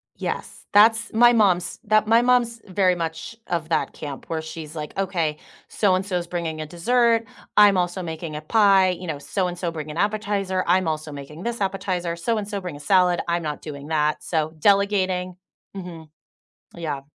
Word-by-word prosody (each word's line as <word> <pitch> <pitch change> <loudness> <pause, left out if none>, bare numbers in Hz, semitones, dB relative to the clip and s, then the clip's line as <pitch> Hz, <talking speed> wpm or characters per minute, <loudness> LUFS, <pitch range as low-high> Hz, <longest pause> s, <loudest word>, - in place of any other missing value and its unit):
Yes. - - -5
That's 225 +2 +5
my 240 +2 +6
mom's 190 -6 +2
that 215 0 +3
my 230 +1 +5
mom's 240 -2 +2
very 185 -1 +2
much 165 +6 -5
of 165 -2 -2
that 165 - 0
camp 145 -2 -7
where 160 -1 -2
she's, 160 -1 -8
like, 150 -1 -6
"Okay, 170 -6 -1 0.3
so-and-so's 185 -3 0
bringing 165 -3 -3
a 155 - -4
dessert, 230 +7 +2 0.3
I'm 205 -2 +7
also 180 +1 -1
making 160 -1 -6
a 150 - -5
pie, 195 +1 +4
you 180 0 -4
know, 150 -3 -3
so 180 +6 -2
and 175 0 -5
so 175 -2 -2
bring 155 -2 -6
an 150 - -8
appetizer, 205 -2 0
I'm 185 0 +3
also 155 0 -3
making 145 +4 -9
this 235 -2 -3
appetizer, 185 -3 -2
so-and-so 205 +2 -2
bring 180 -5 -6
a 145 - -10
salad, 180 +3 +3
I'm 170 0 0
not 150 -1 -4
doing 145 -1 -8
that." 150 -1 0
So, 155 -2 -1
delegating. 190 -2 +2 0.4
Mhm. 170 -5 -8 0.7
Yeah. 155 -5 -4
180 Hz, 175 wpm, -23 LUFS, 160-200 Hz, 0.7 s, I'm